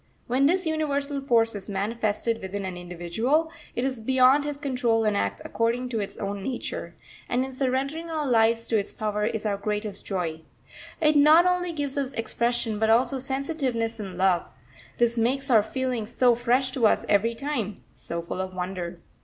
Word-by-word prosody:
When 260 +3 +3
this 365 +3 +1
universal 285 -3 -1
force 230 -4 +3
is 205 0 -7
manifested 215 +2 -1
within 190 +1 -4
an 185 -1 -4
individual, 180 - -1 0.2
it 245 - 0
is 260 -4 -2
beyond 260 +4 +4
his 290 -1 -4
control 250 -5 +1
and 210 -1 +2
acts 100 - -1
according 235 +2 0
to 230 -3 -2
its 200 - -5
own 200 0 -4
nature; 250 +5 -5 0.3
and 250 +2 +1
in 265 - -7
surrendering 275 +5 -1
our 310 -2 -2
lives 230 -2 +3
to 225 - +3
its 200 - -5
power 210 -1 -1
is 220 0 -3
our 205 -2 0
greatest 210 0 -3
joy. 170 -5 -3 0.6
It 305 -2 +3
not 305 +4 +7
only 360 -1 +1
gives 285 -3 -2
us 275 -1 -3
expression, 230 -1 -1
but 220 0 +2
also 255 +4 +3
sensitiveness 265 -4 -2
and 190 -4 -6
love; 185 -2 +2 0.5
this 235 0 +2
makes 265 +4 0
our 220 -3 +7
feelings 240 0 -3
so 250 -1 +5
fresh 245 +2 +1
to 245 -4 +3
us - - +1
every 220 +3 +2
time, 235 -7 -3
so 170 0 -5
full 175 +2 -4
of 185 0 -5
wonder. 180 -1 -4
235 Hz, 180 wpm, -26 LUFS, 205-270 Hz, 0.6 s, not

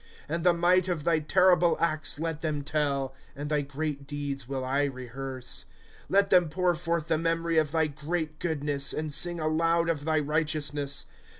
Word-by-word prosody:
« - - -21
And 165 +2 -2
the 180 - +6
might 175 +2 +3
of 170 -5 -2
thy 165 -1 +2
terrible 175 +2 +4
acts 155 -3 +1
let 160 -1 -3
them 150 -3 -2
tell; 140 -3 -1 0.2
And 145 +2 -5
thy 150 -1 +2
great 140 0 -4
deeds 140 -3 -4
will 135 -1 -3
I 140 +2 +1
rehearse. 130 0 -6
^ - - -24
Let 200 0 +3
them 180 -3 +5
pour 180 +2 +1
forth 170 -1 -1
the 160 -1 +1
memory 165 0 +1
of 155 -2 0
thy 160 -1 +2
great 155 +1 -4
goodness. 145 -4 -1
And 155 -1 -2
sing 175 +3 +3
aloud 165 +2 +1
of 150 -3 -1
thy 155 -1 +2
righteousness. 150 -2 0
155 Hz, 185 wpm, -28 LUFS, 145-170 Hz, 0.2 s, the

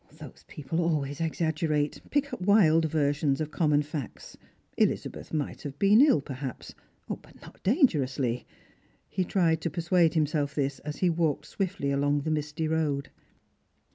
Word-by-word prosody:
Those - - -12
people 155 +4 -3
always 150 -3 -1
exaggerate; 155 -2 -1
pick 285 0 0
up - - -5
wild 180 -5 +5
versions 145 -2 +1
of 155 -1 -3
common 150 -3 +2
facts. 145 -3 -7 0.4
Elizabeth - - -1
might 150 -3 -3
have 140 -1 -7
been 205 - +5
ill, 280 - +5
perhaps, 135 -2 -7 0.3
but - - -8
not - - -15
dangerously. 140 - +1 0.6
He 185 - -1
tried 170 -3 +1
to 170 - -1
persuade 170 0 +2
himself 150 -2 0
this 140 -2 -1
as 150 0 -6
he 175 - +4
walked 160 -3 -1
Bwittly 185 -7 -1
along 145 +1 +1
the 155 +2 -2
misty 150 +1 -2
road. 150 -3 -1
155 Hz, 145 wpm, -28 LUFS, 145-170 Hz, 0.6 s, wild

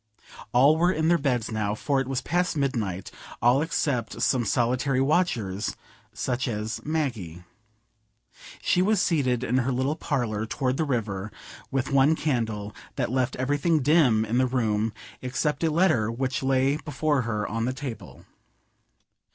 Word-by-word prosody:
All 140 +6 +5
were 175 +2 +3
in 160 -2 +1
their 170 -1 +4
beds 125 -6 0
now, 105 -1 -1
for 135 +4 0
it 130 - -4
was 130 -1 -1
past 175 -1 0
midnight; 110 -10 -2 0.3
all 125 +4 +4
except 140 -7 -1
some 125 -3 +2
solitary 125 +4 +1
watchers 130 - 0 0.4
such 130 0 -2
as 110 -1 -3
Maggie. 120 - -3 1.2
She 180 - +3
was 210 +2 +3
seated 130 -9 +1
in 125 +1 +1
her 130 +1 0
little 130 +4 0
parlour 110 -8 -2
toward 130 +2 -1
the 160 - +1
river, 105 -6 -2 0.4
with 135 0 -1
one 140 +3 +4
candle, 110 -9 -2 0.2
that - - -1
left 130 -1 0
everything 145 +3 +1
dim 130 -8 +4
in 115 +3 0
the 130 - +3
room 110 -3 0 0.3
except 140 +4 -1
a 165 - +3
letter 155 - +2
which 130 +2 -2
lay 135 +1 +2
before 150 -1 0
her 105 -3 -2
on 115 +2 -2
the 125 - 0
table. 130 -4 -8
130 Hz, 150 wpm, -26 LUFS, 115-145 Hz, 1.2 s, All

